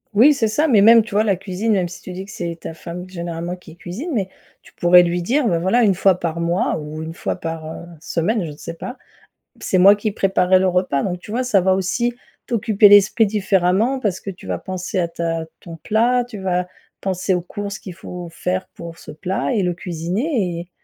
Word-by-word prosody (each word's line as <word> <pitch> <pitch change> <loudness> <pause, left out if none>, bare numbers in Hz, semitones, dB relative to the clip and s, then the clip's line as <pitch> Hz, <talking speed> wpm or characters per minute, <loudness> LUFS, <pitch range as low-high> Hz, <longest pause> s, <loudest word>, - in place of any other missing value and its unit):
Oui, 270 +8 +7
c'est 225 -5 0
ça, 295 +9 +1
mais 225 -8 +5
même, 225 +2 +7
tu 225 - -12
vois, 210 +2 +3
la 200 -3 +2
cuisine, 195 +4 -2
même 185 -3 +1
si 175 - -11
tu 185 - -8
dis 190 +2 -6
que 200 - -12
c'est 170 -1 -5
ta 165 - -7
femme 175 +3 -8
généralement 170 -1 -5
qui 170 -2 -15
cuisine, 205 - -6
mais 205 -8 -1 0.4
tu - - -19
pourrais 180 +1 +6
lui 175 0 -1
dire, 255 +7 +1
bah, 170 -4 +1
voilà, 230 +8 +2
1 200 - +4
fois 185 0 +3
par 170 -1 -3
mois 170 +2 0
ou 155 +1 -6
1 160 +1 -6
fois - - -3
par, 165 -3 -5
heu, 160 +2 -8 0.2
semaine 185 +6 -1
je 160 - -5
sais 165 +3 -8
pas, 245 - -7
p - - -29 0.4
«C'est 185 - 0
moi 200 +3 +7
qui 210 0 -2
préparerais 185 -2 +3
le 190 - +2
repas». 180 -6 +1
Donc 180 -2 -2
tu 210 +4 -10
vois 250 - 0
ça 230 -7 +3
va 185 +1 +3
aussi 235 +6 0 0.3
t'occuper 215 -3 +4
l'esprit 205 +2 +6
différemment 200 +4 +1
parce 205 -7 -2
que 200 - -6
tu 185 - -12
vas - - -2
penser 185 0 -3
à 170 - 0
ta 165 -1 -3
ton 165 -2 -10
plat, 235 +8 +2
tu 240 -4 -9
vas 180 -1 -1 0.3
penser 190 0 -1
aux 180 - 0
courses 200 +3 -6
qu'il 185 - -9
faut 180 -1 -8
faire 180 +3 -3
pour 170 -1 -9
ce - - -11
plat 180 - -2
et 210 -6 +1
le 180 -1 0
cuisiner 180 - -2
et 175 +1 -10
185 Hz, 230 wpm, -20 LUFS, 175-210 Hz, 0.4 s, Oui